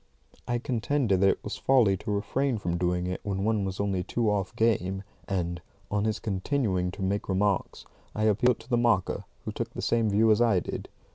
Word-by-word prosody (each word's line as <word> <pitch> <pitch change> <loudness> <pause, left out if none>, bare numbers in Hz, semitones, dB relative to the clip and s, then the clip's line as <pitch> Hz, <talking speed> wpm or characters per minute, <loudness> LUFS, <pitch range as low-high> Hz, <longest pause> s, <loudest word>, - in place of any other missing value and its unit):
I 120 - +1
contended 120 -4 0
that 100 - +6
it - - -1
was - - -4
folly 120 -8 +4
to 105 - -7
refrain 125 +5 0
from 85 -4 -2
doing 90 0 0
it 90 0 -3
when 95 -1 -2
one 105 -2 +1
was 95 -1 -4
only 100 -2 0
two 110 +3 0
off 100 -2 -2
game, 95 -4 +1 0.2
and, 85 -2 -2 0.3
on 105 0 +1
his 110 0 0
continuing 95 -2 -1
to 100 - -5
make 100 +2 -1
remarks, 100 0 0 0.3
I 110 - -1
appealed 110 +3 +3
to 115 - -16
the 120 - +2
marker, 115 -6 +1 0.2
who - - -3
took - - -4
the - - -4
same 115 -2 +2
view 110 +2 +4
as 105 - +4
I 115 -6 +4
did. - - -6
100 Hz, 205 wpm, -28 LUFS, 95-115 Hz, 0.3 s, that